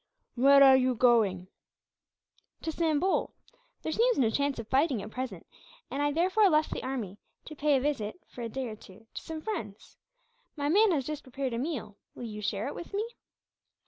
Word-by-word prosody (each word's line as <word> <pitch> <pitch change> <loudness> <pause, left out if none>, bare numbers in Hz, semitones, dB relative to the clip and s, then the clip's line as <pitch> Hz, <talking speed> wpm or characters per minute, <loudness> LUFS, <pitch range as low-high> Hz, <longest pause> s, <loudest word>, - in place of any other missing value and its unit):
"Where 275 +3 +6
are 265 -1 +8
you 255 -1 +2
going?" 215 -7 +3 1.2
"To 320 - -2
Sambol. 325 +3 0 0.5
There 315 - -2
seems 475 +7 +2
no 230 -4 +3
chance 280 +2 0
of 230 - -6
fighting, 270 -1 +2
at - - -9
present; 255 +1 -5 0.5
and 280 - -2
I 290 0 +2
therefore 375 +6 +3
left 305 -1 +2
the - - -3
army 225 -7 -4 0.3
to 310 - -9
pay 290 -1 +2
a - - -1
visit, 275 -1 -2
for 245 - -10
a 230 - -3
day 260 +2 -4
or 220 - -6
two, 210 +1 -16
to - - -6
some 320 -1 -6
friends. 220 - -6 0.6
My 290 -1 -1
man 415 +5 +5
has 280 -6 0
just 305 0 -4
prepared 260 -1 -4
a 230 - -2
meal. 245 -8 -4 0.2
Will - - -8
you 210 -2 -6
share 205 0 -2
it - - -4
with 345 +3 -8
me?" 420 +2 0
270 Hz, 195 wpm, -29 LUFS, 230-310 Hz, 1.2 s, are